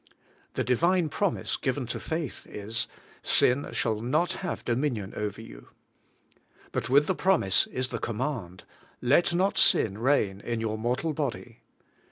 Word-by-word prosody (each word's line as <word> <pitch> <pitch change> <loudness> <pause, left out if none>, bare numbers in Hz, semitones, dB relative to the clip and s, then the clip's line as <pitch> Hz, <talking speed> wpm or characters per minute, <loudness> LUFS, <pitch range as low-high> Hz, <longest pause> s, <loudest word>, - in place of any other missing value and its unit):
The - - 0
Divine 170 +7 +2
promise 200 +5 -1
given 130 -1 -1
to 120 - -4
faith 160 -4 -4
is: 105 +3 -3 0.3
'Sin 130 +3 +3
shall 110 -3 0
not 160 +9 +1
have 185 - -4
dominion 120 -5 -1
over 105 -1 -3
you.' - - -13 1.0
But 115 - -2
with 140 +3 +5
the 190 - +1
promise 180 - +2
is 130 0 -2
the 115 - -3
command: 115 -6 -3 0.4
'Let 175 0 +3
not 190 +3 +2
sin 105 -1 +4
reign 115 -6 +2
in 120 -1 -3
your 110 -1 -2
mortal 125 +8 -1
body.' 140 -4 -4
125 Hz, 145 wpm, -28 LUFS, 110-155 Hz, 1.0 s, with